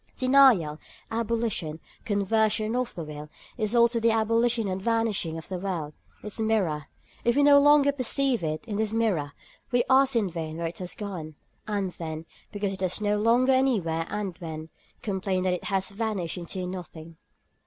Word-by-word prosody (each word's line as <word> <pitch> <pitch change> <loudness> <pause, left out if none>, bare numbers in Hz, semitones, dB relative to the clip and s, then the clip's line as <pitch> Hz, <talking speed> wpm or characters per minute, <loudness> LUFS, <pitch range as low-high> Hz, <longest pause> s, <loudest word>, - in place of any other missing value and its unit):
Denial, 255 - +5 0.3
abolition, 225 -8 -1 0.3
conversion 215 +2 +1
of 250 -1 -2
the 170 - -4
will, 150 0 -8 0.3
is 215 +1 -1
also 235 0 +4
the 230 0 +3
abolition 230 0 +2
and 190 0 -3
the - - -13
vanishing 225 -8 0
of 160 - -8
the 185 -2 -4
world, 175 -6 -3 0.3
its 210 +1 -5
mirror. 190 -10 0 0.4
If 235 0 +2
we 285 - +4
no 285 0 +8
longer 290 0 +6
perceive 265 -4 0
it 155 +3 -3
in 210 -3 -4
this 220 0 -1
mirror, 190 -11 0 0.4
we 245 -1 +3
ask 265 0 +5
in 220 -4 +2
vain 160 -1 -5
where 170 - -3
it 165 +1 -5
has 180 -1 -5
gone, 175 -7 -6 0.3
and 200 -3 -1
then, 160 -2 -6 0.3
because 200 -1 -2
it 190 - -8
has 185 +1 0
no 210 0 +1
longer 240 +4 +4
any 260 -3 +3
where 165 -1 -2
and 205 -4 -3
when, 160 -1 -7 0.3
complain 190 -2 -1
that 185 -1 +1
it 180 - -4
has 195 -2 0
vanished 200 -4 -3
into 180 +1 -5
nothing. 170 -3 -8
205 Hz, 180 wpm, -27 LUFS, 170-230 Hz, 0.4 s, no